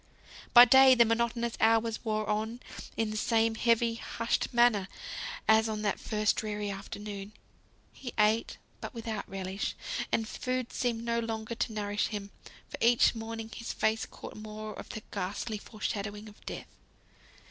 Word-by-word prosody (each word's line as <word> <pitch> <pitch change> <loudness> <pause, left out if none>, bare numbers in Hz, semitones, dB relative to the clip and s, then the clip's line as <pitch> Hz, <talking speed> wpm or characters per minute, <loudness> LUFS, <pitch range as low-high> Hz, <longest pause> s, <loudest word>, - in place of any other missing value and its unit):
By 240 0 +11
day 265 +1 +8
the 235 -1 +6
monotonous 235 +1 0
hours 225 0 +3
wore 215 -2 -1
on 220 +3 -1 0.4
in 220 -1 0
the 215 - -3
same 225 0 +2
heavy, 230 0 +2
hushed 230 0 -2
manner 235 -5 +4 0.6
as 220 0 +5
on 215 -1 -3
that 205 - 0
first 215 -1 +1
dreary 210 -1 -2
afternoon. 200 +1 -7 0.6
He 250 -3 -7
ate, 215 +2 +2 0.2
but - - -7
without 225 -3 -4
relish; 190 0 -3 0.4
and 225 -1 +1
food 255 0 -3
seemed 235 -2 -1
no 235 0 0
longer 225 0 -3
to 235 0 -1
nourish 205 -1 -1
him, 205 -2 -5 0.4
for - - -8
each 235 +1 +5
morning 225 0 -6
his 230 - -5
face 220 +1 +1
had - - -5
caught - - -10
more 215 0 -7
of - - -9
the 215 - -6
ghastly 205 +4 -3
fore 215 +1 -14
shadowing 210 0 -3
of 210 - -15
Death. - - -7
220 Hz, 160 wpm, -30 LUFS, 210-230 Hz, 0.6 s, By